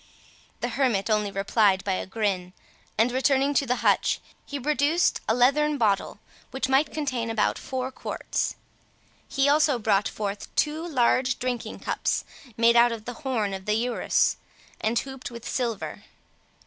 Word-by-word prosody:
The - - -1
hermit 230 -7 +1
only 210 -1 +2
replied 195 0 +2
by 200 - -1
a 185 - -3
grin; 190 -3 -2 0.4
and 225 +3 +3
returning 270 +2 +2
to 280 -1 +1
the 250 - +2
hutch, - - +3 0.3
he 285 - -4
produced 295 +5 +2
a 220 - +3
leathern 290 +4 +3
bottle, 205 -5 +1 0.3
which 265 -1 -2
might 270 +3 +3
contain 255 -7 -2
about 225 -2 +1
four 260 0 -4
quarts. - - -3 0.7
He 275 +1 +2
also 290 -2 +4
brought 210 -3 +2
forth 205 -1 -4
two 310 +3 0
large 255 -3 +2
drinking 250 -2 -4
cups, - - -1 0.3
made 230 0 +5
out 240 0 +6
of 225 -2 -6
the 245 - -5
horn 230 -8 -1
of 190 0 -6
the 210 - +2
urus, 240 +2 +1 0.4
and 225 +2 0
hooped 265 0 -4
with 235 -1 -9
silver. 235 -5 -3
245 Hz, 155 wpm, -26 LUFS, 215-270 Hz, 0.7 s, out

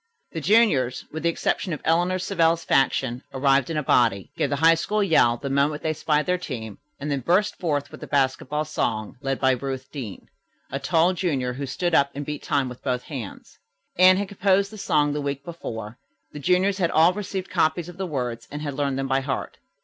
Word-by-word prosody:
The 165 - -4
juniors, 150 - +3
with 160 - -5
the 170 - +2
exception 170 +1 -1
of 150 - -5
Eleanor 175 +3 +2
Savell's 170 -3 +1
faction, 130 -2 +1
arrived 135 -1 +3
in 165 - -2
a 150 - 0
body, 115 -7 +2
gave - - 0
the 145 - 0
High 165 +4 +5
School 205 +6 0
yell 120 -10 +4
the 140 - -6
moment 140 +2 +1
they 155 - 0
spied 150 -1 0
their 180 0 0
team, 115 - -6 0.2
and 145 +1 -3
then 140 - 0
burst 180 - +1
forth 145 -5 -1
with - - -11
the - - -7
basketball 140 +2 0
song, 110 -8 -2
led 135 -1 -2
by 130 -1 +4
Ruth 130 +1 -4
Deane, 120 -10 -7 0.5
a 135 - -2
tall 165 +5 +2
junior, 140 -9 -1
who 140 +2 -5
stood 175 +6 -2
up 140 -3 +4
and 145 +1 -4
beat 150 0 -5
time 140 -3 0
with 125 -1 -9
both 125 -2 -1
hands. 125 -9 -8 0.4
Anne 185 +1 +7
had 200 0 -2
composed 200 0 +2
the 215 - -10
song 145 -5 +2
the 150 - -2
week 140 0 -4
before. 115 -9 -7 0.3
The 150 - -8
juniors 185 +6 +2
had 170 -3 +2
all 165 +3 +5
received 195 -1 -5
copies 165 -1 +1
of 175 0 -10
the 190 -1 -3
words 125 -6 -4
and 145 +1 -6
had 145 -2 -3
learned 140 -1 -1
them 135 0 -2
by 135 0 +2
heart. 135 0 -4
145 Hz, 215 wpm, -24 LUFS, 135-175 Hz, 0.5 s, Anne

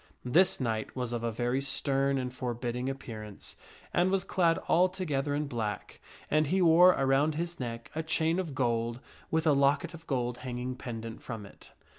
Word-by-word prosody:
This 175 +9 +4
knight 110 -4 -2
was 125 -2 -3
of 120 -1 -3
a 115 - 0
very 120 +4 0
stern 140 0 +1
and 125 -1 -3
forbidding 125 0 -3
appearance, 110 -6 -8 0.4
and 175 +1 +3
was 190 -1 +1
clad 170 -4 +2
altogether 165 -6 +1
in 150 +1 -1
black, 115 -6 -4 0.3
and 155 0 +2
he 190 +6 +1
wore 175 +1 +7
around^his 150 +5 +1
neck 115 -2 -5
a 160 - -1
chain 160 +2 +1
of 165 -7 -4
gold, 120 -2 0 0.3
with 160 0 +1
a 155 - +5
locket 140 +5 +2
of 165 0 -12
gold 125 -3 -1
hanging 125 0 -4
pendant 115 -3 -7
from 115 -4 -6
it. 100 - -16
135 Hz, 170 wpm, -30 LUFS, 120-160 Hz, 0.4 s, wore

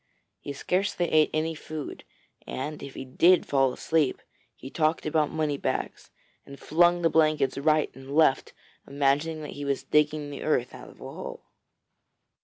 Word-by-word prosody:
He 145 - -7
scarcely 180 +4 -1
ate 155 -1 +4
any 160 +1 -1
food, 155 -1 -7 0.4
and 150 +3 -5
if 140 -1 -9
he 130 - -6
did 170 +7 +4
fall 135 -2 +2
asleep, 155 +1 0 0.4
he 135 - -10
talked 155 0 0
about 155 -1 +1
money 155 -2 -1
bags, - - -3 0.3
and 140 0 -12
flung 175 +2 +3
the 165 - +4
blankets 155 -4 +2
right 155 +2 +2
and 135 0 -13
left, 155 -4 +3 0.4
imagining 145 +3 0
that 150 - -7
he 145 - -7
was 140 -1 -1
digging 150 -1 +1
the 140 - -7
earth 125 -5 0
out - - -11
of - - -17
the - - -13
hole. - - -8
150 Hz, 165 wpm, -27 LUFS, 140-160 Hz, 0.4 s, ate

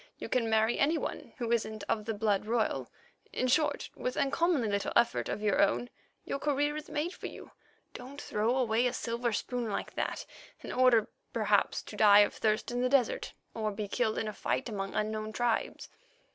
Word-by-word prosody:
You - - -7
can 235 -3 +1
marry 220 +1 +2
any 310 +4 +3
one - - -5
who 235 -3 -2
isn't 220 -2 -1
of 215 -2 -1
the 225 -1 -2
blood 205 -1 0
royal; 230 -1 0 0.4
in - - -1
short, 290 +2 +1
with 250 - -3
uncommonly 285 -2 +2
little 200 -1 -1
effort 235 0 +2
of 210 - -3
your 205 -2 +3
own, 240 +5 +1 0.3
your 275 - -3
career 290 +1 +1
is 305 0 -6
made 310 +5 -2
for - - -7
you. - - -11 0.4
Don't 265 +3 -9
throw 225 0 0
away 240 -1 +2
a 245 - -2
silver 235 +1 -2
spoon 240 +2 -2
like 200 - -3
that - - -3 0.4
in - - -7
order, 250 -4 +4 0.3
perhaps, - - +2
to - - -10
die 210 -1 +7
of 205 - +2
thirst 215 +1 0
in 245 0 -1
the 255 - +2
desert 260 -4 +1 0.2
or 215 -1 -1
be 205 0 -4
killed 220 +1 0
in 220 - -1
a 215 - -4
fight 255 - -2
among 195 -3 -4
unknown 215 0 -2
tribes." 240 -1 -1
230 Hz, 195 wpm, -31 LUFS, 215-255 Hz, 0.4 s, die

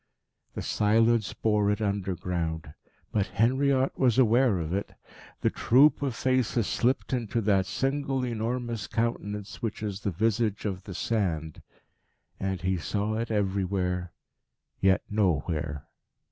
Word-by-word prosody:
The - - -4
silence 110 0 +2
bore 105 -2 +1
it 105 - 0
underground. 90 -6 -2 0.4
But 105 -2 +1
Henriot 130 +5 +1
was 125 -3 +3
aware 120 -3 +4
of 80 0 -3
it. 100 +1 -3 0.5
The - - +2
troop 140 +6 +4
of 135 -4 -1
faces 125 -2 +1
slipped 125 +5 0
into 120 -2 -1
that 100 -3 +2
single, 135 +2 -1
enormous 115 -1 -3
countenance 105 -3 -3
which 110 -2 -3
is 100 -2 -3
the 105 - -2
visage 110 +3 0
of 95 -1 -3
the 95 - -7
Sand. 85 -9 -2 0.8
And 95 -2 -2
he 95 +1 0
saw 100 +7 -2
it 115 +1 -2
everywhere, 95 -3 -1 0.7
yet 95 -1 +3
nowhere. 80 -7 -1
105 Hz, 130 wpm, -28 LUFS, 95-115 Hz, 0.8 s, aware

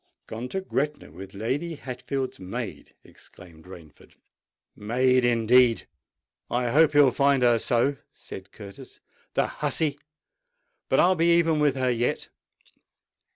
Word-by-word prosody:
"Gone 115 +3 -7
to 190 - -3
Gretna 150 -5 -3
with 95 +2 -11
Lady 135 +11 -3
Hatfield's 135 -2 -5
maid!" 95 -1 -7
exclaimed 85 -3 -16
Rainford. 85 -5 -15 0.6
"Maid, 125 +4 +1
indeed! 120 0 +3 0.6
I 120 -1 -1
hope 155 +2 +4
he'll 145 -3 +5
find 140 0 +2
her 120 -1 +4
so!" 125 +5 +1
said 95 +1 -11
Curtis. 100 -2 -12 0.4
"The - - +2
hussey! 145 -3 -2 0.9
But - - +2
I'll 185 +2 +4
be 170 -1 +3
even 165 -2 +2
with 145 -2 +2
her 130 -1 0
yet!" 120 0 -2
125 Hz, 125 wpm, -25 LUFS, 110-145 Hz, 0.9 s, he'll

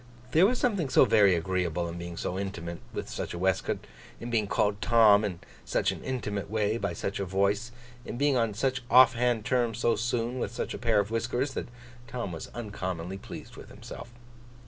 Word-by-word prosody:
There 175 +5 +6
was 250 +3 0
something 200 - 0
so - - +6
very 100 -4 +5
agreeable 85 -1 -1
in 85 +1 -6
being 85 0 -7
so 90 - -3
intimate 85 -4 -5
with - - -5
such - - -5
a - - -5
waistcoat; 95 +1 0 0.3
in 120 +1 -6
being 110 -3 +1
called 105 0 +1
Tom, 110 -3 +6
in 90 -5 -3 0.2
such - - +1
an - - -8
intimate 105 -7 -3
way, 110 +1 0
by 100 -5 -2
such 100 +4 -3
a - - 0
voice; 100 +5 0 0.3
in 120 - -6
being 140 +1 +3
on 115 -4 +1
such 130 +2 0
off 125 0 +8
hand 120 -3 0
terms 120 -4 +1
so 120 0 +2
soon, 120 +2 -1
with - - -2
such 120 - -4
a - - -6
pair 115 -3 +2
of 100 +1 -1
whiskers; 120 +4 -1
that - - -4 0.4
Tom 120 -7 -4
was 80 - -6
uncommonly 95 -5 -4
pleased - - -10
with - - -11
himself. 120 - -10
105 Hz, 200 wpm, -28 LUFS, 95-120 Hz, 0.4 s, off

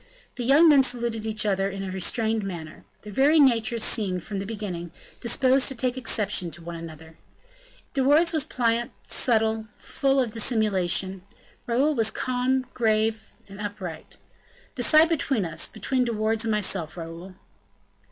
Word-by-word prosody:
The 245 - -5
young 285 +7 +6
men 290 -3 +7
saluted 235 -3 -1
each 215 -1 -1
other 195 -1 +1
in 195 0 -6
a 190 - -5
restrained 220 +4 0
manner. 170 -5 -7 0.2
Their 210 -1 -9
very 290 +7 +4
natures 235 -4 +3
seemed, 185 -6 -1
from 205 -2 -5
the 195 - -5
beginning, 195 -6 -5 0.3
disposed 260 +2 +2
to 270 - 0
take 250 +1 -1
exception 210 -7 -1
to 165 +2 -9
each 165 -1 -7
other. 160 +1 -14 0.7
De 270 - 0
Wardes 310 +6 +4
was 310 -3 +2
pliant, 235 -1 0 0.2
subtle, 220 -2 +1
full 275 -1 0
of 245 -4 0
dissimulation; 195 -5 0 0.5
Raoul 265 +6 +2
was 225 -5 +1
calm, 255 +2 -1
grave, 220 -1 0 0.2
and 195 +1 -10
upright. 195 -6 -7 0.6
"Decide 310 +5 +5
between 275 - 0
us 165 -1 -2
between 250 +4 -1
De 235 - -2
Wardes 220 +1 0
and 225 - 0
myself, 190 -6 -2
Raoul." 170 +3 -8
220 Hz, 155 wpm, -25 LUFS, 195-255 Hz, 0.7 s, men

